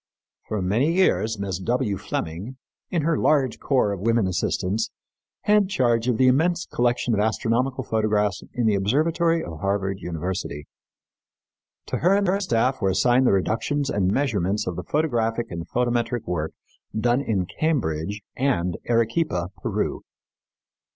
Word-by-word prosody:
For 105 -3 -2
many 120 - +2
years 115 - +2
Mrs. 95 -2 -4
W. 120 -4 0
Fleming, 95 +7 -5 0.3
with 170 -4 0
her 165 +1 +1
large 135 -6 +2
corps 130 -7 +2
of 100 - -3
women 115 +1 +2
assistants, 95 +3 -1 0.5
had 210 -2 +3
charge 120 - +1
of 125 -3 +2
the 130 - +4
immense 165 +7 +3
collection 120 0 0
of 105 - +1
astronomical 120 +4 0
photographs 105 -3 0
in 120 - -1
the 110 - +4
Observatory 160 - +1
of 80 -2 -7
Harvard 100 -1 -1
University. 85 -4 -4 1.2
To - - -2
her 185 +4 +3
and 200 0 +2
her 195 +2 +2
staff 130 - +1
were 95 - +2
assigned 120 +7 +3
the - - +5
reductions 130 +9 0
and 95 -2 +1
measurements 105 -6 0
of 90 - -3
the 90 - -5
photographic 120 - 0
and 85 -1 -6
photometric 120 -1 0
work 80 -3 -2 0.5
done 120 +3 +2
in 100 -9 0
Cambridge 105 - -1
and 90 -11 0
Arequipa, 115 - +1
Peru. - - -2
115 Hz, 145 wpm, -24 LUFS, 95-135 Hz, 1.2 s, the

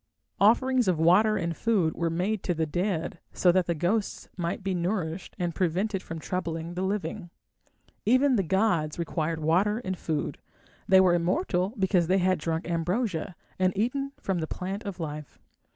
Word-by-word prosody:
Offerings 245 +3 +4
of 180 -3 +2
water 195 +7 +4
and 170 -3 -2
food 190 -5 +1
were 170 -1 -1
made 185 +5 -1
to 175 - -1
the 160 0 0
dead 175 +1 -2
so 180 - +4
that 185 0 +2
the 170 - 0
ghosts 200 +7 -1
might 175 +1 -3
be 195 0 -1
nourished 175 -1 -2
and 175 -1 -2
prevented 190 +4 0
from 165 - -7
troubling 165 0 -4
the 180 - -3
living. 195 -1 -3 0.7
Even 255 +3 +4
the 205 - +3
gods 170 -4 +1
required 165 -1 -2
water 190 +7 +2
and 185 0 -1
food; 160 -4 -3 0.5
they 190 0 +7
were 185 -2 +5
immortal 180 - 0
because 185 -3 +2
they 185 +2 +3
had 185 -2 +2
drunk 160 +1 -2
ambrosia 175 +1 -1 0.2
and 185 +1 +1
eaten 275 +6 -1
from 190 -3 -1
the 160 - -2
plant 195 +5 -4
of 195 -3 -5
life. 150 -3 -6
180 Hz, 170 wpm, -27 LUFS, 165-200 Hz, 0.7 s, they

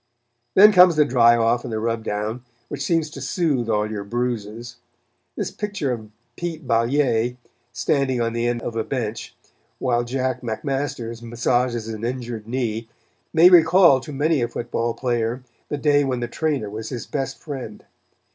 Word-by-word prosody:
Then 210 +2 +9
comes 180 -3 +7
the 150 -1 +4
dry 120 -3 +5
off 115 +1 +2
and 125 - -6
the 110 - -2
rub 115 0 -2
down, 105 +3 -3 0.3
which - - -5
seems 165 -2 +1
to 135 - -9
soothe 135 -5 0
all 105 -1 +1
your 105 -2 -5
bruises. 120 +1 -4 0.6
This - - -3
picture 205 -10 -3
of 110 -3 -5 0.3
Pete 170 -3 -5
Balliet 120 0 +1 0.3
standing 130 +1 0
on 115 -1 0
the 120 0 0
end 120 -1 -2
of 115 - -4
a 115 - 0
bench, 115 -4 -4 0.4
while 120 -2 0
Jack 130 +1 -2
McMasters 120 -1 -3
massages 120 0 -1
an 110 -1 -6
injured 120 -3 -4
knee 115 -2 -3 0.4
may 165 +2 +7
recall 170 -3 +6
to 130 - -9
many 145 +1 +1
a 120 - +1
football 120 0 -3
player 120 0 -1 0.3
the 145 - -2
day 145 0 +3
when 130 -3 -1
the 120 - -2
trainer 145 -3 -1
was 110 +2 -6
his 120 -3 -5
best 135 -2 -3
friend. 130 -8 -8
120 Hz, 165 wpm, -22 LUFS, 115-140 Hz, 0.6 s, Then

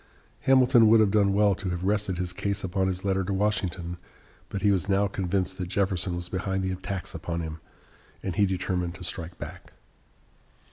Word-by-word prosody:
Hamilton 125 -3 +6
would 110 +1 +7
have 105 -3 +4
done 100 -2 +4
well 100 0 +4
to 95 0 -4
have 90 0 -3
rested 100 -2 0
his 90 -1 -3
case 100 +2 -2
upon 95 +1 0
his 95 0 -3
letter 95 -1 +1
to 95 - -3
Washington, 95 -4 -1 0.5
but 100 - -4
he 105 - +5
was 95 0 0
now 100 +1 +3
convinced 95 -1 -1
that 90 - -2
Jefferson 95 -2 0
was 85 0 -4
behind 95 +1 -2
the 95 - -1
attacks 95 0 -4
upon 85 -1 -3
him, 80 0 -5 0.6
and 95 -3 -3
he 100 +1 +4
determined 90 -2 -2
to 90 - -9
strike 85 0 -4
back. - - -9
95 Hz, 190 wpm, -27 LUFS, 90-100 Hz, 0.6 s, would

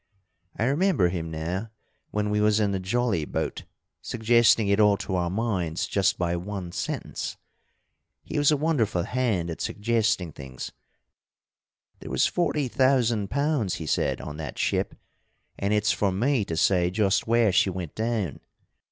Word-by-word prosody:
I - - 0
remember 140 - +2
him 85 -2 -4
now, 85 +7 -3 0.4
when 105 0 -1
we 105 0 +1
was 105 0 +3
in 105 -2 +2
the 95 - -1
jolly 100 -2 0
boat, - - -3 0.4
suggesting 115 -1 +3
it 100 +1 +2
all 105 -1 +5
to 95 - -5
our 90 -2 0
minds 95 -3 -1
just 100 -2 +1
by 85 -1 0
one 90 -1 -5
sentence. - - -4 0.9
He - - -3
was 145 - +4
a 150 - +3
wonderful 135 - +1
hand 110 -9 -1
at 80 - -6
suggesting 105 -5 0
things. 65 -3 -8 1.3
'There - - -9
was - - +2
forty 150 -5 0
thousand 120 -6 +2
pounds,' 140 - 0
he 80 - -6
said, - - 0
'on 75 0 -7
that 75 -4 -6
ship, - - 0 0.6
and 100 +1 0
it's 105 0 +2
for 100 -2 +1
me 120 +3 +1
to 80 - -4
say 90 0 +3
just 100 +2 +1
where 115 -2 +4
she 95 - +3
went 90 -4 -5
down.' 110 - -2
105 Hz, 160 wpm, -26 LUFS, 90-115 Hz, 1.3 s, all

